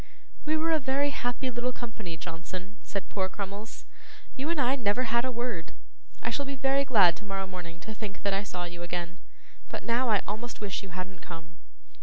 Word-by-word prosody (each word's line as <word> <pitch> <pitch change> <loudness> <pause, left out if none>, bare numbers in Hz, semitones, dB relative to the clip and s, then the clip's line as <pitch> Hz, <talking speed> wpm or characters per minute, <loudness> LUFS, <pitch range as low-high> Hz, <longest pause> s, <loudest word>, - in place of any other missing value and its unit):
'We 310 +1 +3
were 325 +1 +3
a 320 - +5
very 275 +1 +3
happy 250 0 0
little 240 +1 0
company, 220 -9 -5
Johnson,' 180 +5 -6
said 200 - -3
poor 190 -2 0
Crummles. 200 +3 -5 0.5
'You 275 +4 -1
and 335 -2 +2
I 260 0 +5
never 240 -1 +3
had 235 +1 +3
a 260 - +1
word. 235 -8 -2 0.5
I - - +1
shall 285 - +1
be 275 - -1
very 270 +1 +4
glad 205 -10 +7
tomorrow 195 -2 -2
morning 175 -2 -6
to 220 - -5
think 210 -2 -5
that 200 -1 +3
I 195 - +3
saw 180 -3 -3
you 175 0 -5
again, 175 +1 -2 0.5
but - - -3
now 240 +1 +3
I 210 -3 +5
almost 220 +4 -3
wish 205 -3 -1
you 195 - -8
hadn't 185 +2 -5
come. 165 0 -8
210 Hz, 200 wpm, -31 LUFS, 185-250 Hz, 0.5 s, glad